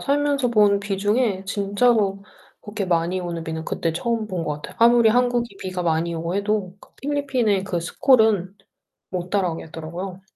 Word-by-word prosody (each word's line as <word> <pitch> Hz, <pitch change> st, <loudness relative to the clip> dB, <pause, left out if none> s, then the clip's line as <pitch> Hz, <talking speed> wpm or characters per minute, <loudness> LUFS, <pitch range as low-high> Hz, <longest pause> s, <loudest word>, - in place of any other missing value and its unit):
살면서 280 Hz, -2 st, +1 dB
본 205 Hz, -3 st, +4 dB
비 200 Hz, -1 st, -3 dB
중에 205 Hz, -1 st, 0 dB
진짜로 200 Hz, 0 st, +1 dB, 0.4 s
그렇게 210 Hz, -1 st, -4 dB
많이 175 Hz, +1 st, 0 dB
오는 170 Hz, -2 st, -5 dB
비는 160 Hz, 0 st, -5 dB
그때 165 Hz, -, -1 dB
처음 225 Hz, +5 st, -2 dB
본 180 Hz, -4 st, -3 dB
것 150 Hz, -1 st, -4 dB
같아요. -, -, -10 dB
아무리 235 Hz, -1 st, +6 dB
한국이 240 Hz, -3 st, +1 dB
비가 185 Hz, -1 st, -4 dB
많이 165 Hz, 0 st, 0 dB
오고 165 Hz, +2 st, -3 dB
해도 200 Hz, -2 st, -1 dB
그 -, -, -18 dB
필리핀의 260 Hz, -8 st, 0 dB
그 175 Hz, -3 st, -2 dB
스콜은 215 Hz, -, +3 dB, 0.6 s
못 180 Hz, -1 st, -4 dB
따라오겠더라고요. 175 Hz, 0 st, -4 dB
200 Hz, 350 characters per minute, -22 LUFS, 175-230 Hz, 0.6 s, 아무리